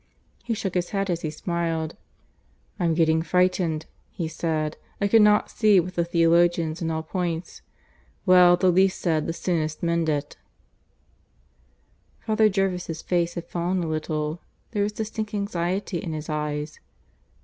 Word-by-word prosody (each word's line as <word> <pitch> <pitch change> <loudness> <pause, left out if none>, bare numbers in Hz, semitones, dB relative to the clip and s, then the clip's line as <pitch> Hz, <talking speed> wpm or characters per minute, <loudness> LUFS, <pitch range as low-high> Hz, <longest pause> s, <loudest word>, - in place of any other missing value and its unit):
He 230 - -2
shook 200 -4 -3
his 175 -1 -1
head 195 -2 -1
as 170 -1 -2
he 155 - -2
smiled. 165 0 -2 0.8
"I'm 170 -2 +1
getting 160 -1 +3
frightened," 175 -2 +1 0.2
he 170 - -4
said. 155 -1 -2 0.2
"I 200 - +2
cannot 210 0 +4
see 210 -4 +4
with 180 +1 -3
the 170 - +1
theologians 170 -1 +2
in 165 - -1
all 160 0 -2
points. 175 0 -4 0.6
Well, 180 -2 +7
the 185 0 +3
least 190 +2 +3
said, 160 -4 0
the - - 0
soonest 160 -3 -2
mended." 160 -4 0 1.9
Father 220 -1 +3
Jervis' 180 -4 -2
face 175 -1 0
had 170 - -5
fallen 175 +1 -1
a - - -3
little. 155 0 -2 0.3
There 210 -3 -1
was 205 +1 +1
distinct 215 0 -4
anxiety 190 -1 -2
in 165 - -5
his 155 +1 -6
eyes. 150 0 -3
170 Hz, 145 wpm, -25 LUFS, 160-185 Hz, 1.9 s, Well